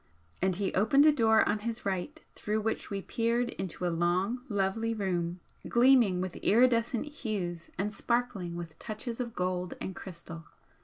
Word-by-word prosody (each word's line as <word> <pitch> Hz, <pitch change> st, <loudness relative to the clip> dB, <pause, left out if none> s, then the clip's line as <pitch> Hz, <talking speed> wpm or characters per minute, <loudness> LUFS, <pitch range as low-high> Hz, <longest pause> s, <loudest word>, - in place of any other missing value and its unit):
And 185 Hz, 0 st, +2 dB
he 195 Hz, +1 st, -1 dB
opened 240 Hz, +9 st, +5 dB
a 310 Hz, -, +8 dB
door 225 Hz, -6 st, +4 dB
on 210 Hz, -, +1 dB
his 230 Hz, +2 st, -5 dB
right, 200 Hz, -, -2 dB
through 215 Hz, +1 st, -2 dB
which 220 Hz, +1 st, -2 dB
we 195 Hz, -1 st, -3 dB
peered 235 Hz, +1 st, 0 dB
into 180 Hz, -1 st, -4 dB
a 175 Hz, -, +1 dB
long, 180 Hz, +8 st, +1 dB
lovely 210 Hz, +3 st, 0 dB
room, 175 Hz, -3 st, -2 dB, 0.3 s
gleaming 235 Hz, -7 st, +5 dB
with 185 Hz, -1 st, -4 dB
iridescent 235 Hz, +1 st, +3 dB
hues 205 Hz, -, -4 dB
and 210 Hz, +3 st, -1 dB
sparkling 205 Hz, -7 st, -1 dB
with 170 Hz, -2 st, -7 dB
touches 230 Hz, +2 st, -5 dB
of 235 Hz, -2 st, -4 dB
gold 180 Hz, 0 st, -2 dB
and 190 Hz, -, -5 dB
crystal. 170 Hz, -3 st, -8 dB
210 Hz, 160 wpm, -30 LUFS, 180-235 Hz, 0.3 s, a